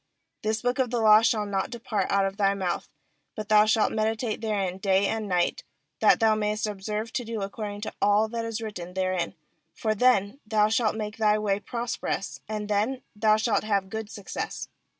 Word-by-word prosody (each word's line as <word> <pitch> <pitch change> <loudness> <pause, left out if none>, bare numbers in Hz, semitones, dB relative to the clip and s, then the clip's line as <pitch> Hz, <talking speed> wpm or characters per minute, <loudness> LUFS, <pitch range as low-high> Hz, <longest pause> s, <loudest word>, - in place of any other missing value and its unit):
8This 220 +2 -1
book 245 +2 0
of 255 -2 +2
the 240 0 -1
law 215 -1 +7
shall 220 -2 +2
riot 195 -2 -2
depart 220 -4 -2
out 195 0 +3
of 195 0 -3
thy 200 -1 +2
mouth, 185 -3 -2 0.5
but 215 -1 -6
thou 210 0 +6
shalt 215 0 +3
meditate 220 +1 -1
therein 195 -4 -1
day 195 0 +2
and 220 +1 -1
night, 180 -2 0 0.4
that - - +5
thou 225 -1 +4
mayest 215 0 -1
observe 210 +2 -4
to 250 - -1
do 225 -3 -4
according 205 +1 -5
to 215 - -5
all 205 +2 +4
that 230 0 -3
is 230 0 -4
written 180 -5 -6
therein; 185 -1 -1 0.4
for 215 -1 0
then 215 0 +2
thou 215 -1 +2
shalt 220 -1 +1
make 210 -1 -4
thy 215 -1 +3
ways 205 -1 0
prosperous, 235 -4 -3
and 210 -1 -3
then 215 +6 0
thou 215 0 +4
shalt 220 0 +1
have 200 -3 0
good 220 -1 -4
success. 205 -3 -5
215 Hz, 190 wpm, -26 LUFS, 200-220 Hz, 0.5 s, law